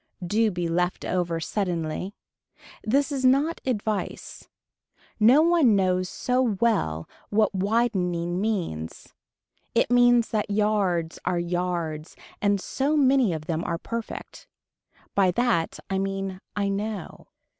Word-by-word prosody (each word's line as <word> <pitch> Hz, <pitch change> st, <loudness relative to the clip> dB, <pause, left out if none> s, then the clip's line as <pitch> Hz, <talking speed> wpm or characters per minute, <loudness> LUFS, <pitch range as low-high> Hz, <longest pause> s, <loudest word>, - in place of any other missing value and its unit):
Do 215 Hz, +5 st, +2 dB
be 175 Hz, -3 st, -2 dB
left 180 Hz, +2 st, -1 dB
over 175 Hz, -2 st, -1 dB
suddenly. 175 Hz, 0 st, -3 dB, 0.7 s
This 275 Hz, +7 st, +1 dB
is 270 Hz, -2 st, -2 dB
not 280 Hz, +6 st, +3 dB
advice. 215 Hz, -4 st, -3 dB, 0.7 s
No 250 Hz, +8 st, +6 dB
one 325 Hz, -10 st, +4 dB
knows 185 Hz, -1 st, +1 dB
so 250 Hz, 0 st, 0 dB
well 200 Hz, -, 0 dB, 0.2 s
what 210 Hz, -1 st, +2 dB
widening 185 Hz, -4 st, 0 dB
means. 175 Hz, -, -3 dB, 0.6 s
It -, -, +2 dB
means 245 Hz, -1 st, +5 dB
that 215 Hz, -1 st, -1 dB
yards 200 Hz, -5 st, 0 dB
are 180 Hz, -1 st, 0 dB
yards 170 Hz, -2 st, -3 dB, 0.3 s
and 200 Hz, -1 st, +2 dB
so 280 Hz, +9 st, -1 dB
many 265 Hz, -6 st, +4 dB
of 155 Hz, -2 st, -4 dB
them 165 Hz, +1 st, -2 dB
are 170 Hz, -, -2 dB
perfect. 230 Hz, +5 st, -7 dB, 0.7 s
By 195 Hz, -2 st, +3 dB
that 235 Hz, -7 st, +1 dB
I 195 Hz, -1 st, -1 dB
mean 195 Hz, -1 st, -3 dB
I 200 Hz, -1 st, 0 dB
know. 200 Hz, -1 st, -4 dB
200 Hz, 125 wpm, -25 LUFS, 175-230 Hz, 0.7 s, No